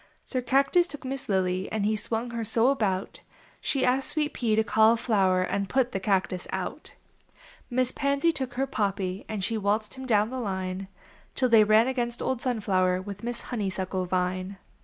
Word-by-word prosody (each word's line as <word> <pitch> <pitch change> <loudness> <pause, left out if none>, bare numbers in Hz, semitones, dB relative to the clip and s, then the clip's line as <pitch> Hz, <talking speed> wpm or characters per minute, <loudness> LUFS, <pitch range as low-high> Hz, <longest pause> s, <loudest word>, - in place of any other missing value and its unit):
Sir 255 - -2
Cactus 275 +8 +3
took 290 -6 -8
Miss 270 -1 -5
Lily, 185 -1 0
And 215 -2 -1
he 215 +1 +2
swung 225 +3 -2
her 230 -1 -3
so 225 +3 +3
about 200 -8 -1 0.4
She 275 - 0
asked 260 +2 +1
Sweet 300 -2 -1
Pea 225 -3 +1
to 220 - +3
Cauliflower 220 -4 +3
And 200 +1 -2
put 255 -1 +1
the 195 - -2
Cactus 190 -2 0
out. - - -5 0.7
Miss 255 0 +1
Pansy 280 +4 +1
took 265 -5 -4
her 265 +2 +1
Poppy 200 -6 -2
And 210 -3 -3
she 225 +2 -1
waltx.ed 210 +1 0
him 260 0 -8
down 215 -1 +2
the 260 - -3
line 190 -3 -3 0.5
Till 255 -2 +1
they 225 -2 +7
ran 215 +3 +5
against 240 -2 -2
old 260 -2 -1
Sunflower 190 -8 +1
With 200 0 -7
Miss 240 0 -3
Honeysuckle 190 -4 -2
Vine. 185 +1 -1
220 Hz, 180 wpm, -27 LUFS, 195-255 Hz, 0.7 s, they